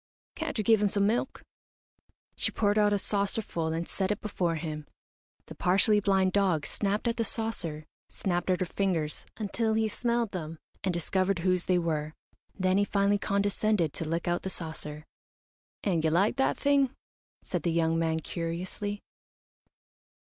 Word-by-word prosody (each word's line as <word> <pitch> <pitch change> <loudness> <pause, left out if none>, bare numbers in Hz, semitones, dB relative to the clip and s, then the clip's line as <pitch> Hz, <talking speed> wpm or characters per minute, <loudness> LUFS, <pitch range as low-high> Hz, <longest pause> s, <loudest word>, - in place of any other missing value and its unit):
"Can't - - -4
you 215 - +1
give 220 0 +4
him 210 - +4
some 200 0 +2
milk?" 225 +4 0 0.9
She - - 0
poured 205 0 +2
out 210 0 +4
a 205 - +3
saucer 200 +2 0
full 165 -4 -3
and 165 +1 -2
set 190 -1 -1
it 205 - -1
before 180 -5 -1
him. 155 -2 -5 0.6
The - - -9
partially 200 +4 +3
blind 190 -2 +3
dog 185 -7 +2
snapped 205 +3 -1
at 230 - 0
the 230 - +2
saucer, 185 -9 -2 0.2
snapped 175 -1 -1
at 185 0 +2
her - - +2
fingers 170 -4 -1
until 220 +1 0
he 220 0 +2
smelled 235 -1 0
them 165 -3 -5 0.3
and 190 - +1
discovered 185 +2 +1
whose 185 -1 +2
they 185 - +3
were, 155 -3 -1 0.4
then 185 0 +2
he - - +4
finally 200 0 +2
condescended 200 -4 +1
to 160 - -4
lick 165 +1 -1
out 175 0 +1
the 190 - -4
saucer. 155 -3 -5 0.8
"And 175 -6 +1
you 160 - +3
like 195 +9 +2
that 270 - +2
thing?" 275 -2 +2 0.5
said 180 - -2
the 170 - 0
young 165 0 +2
man, 160 -1 0
curiously. 180 +6 -4
190 Hz, 170 wpm, -29 LUFS, 165-205 Hz, 0.9 s, give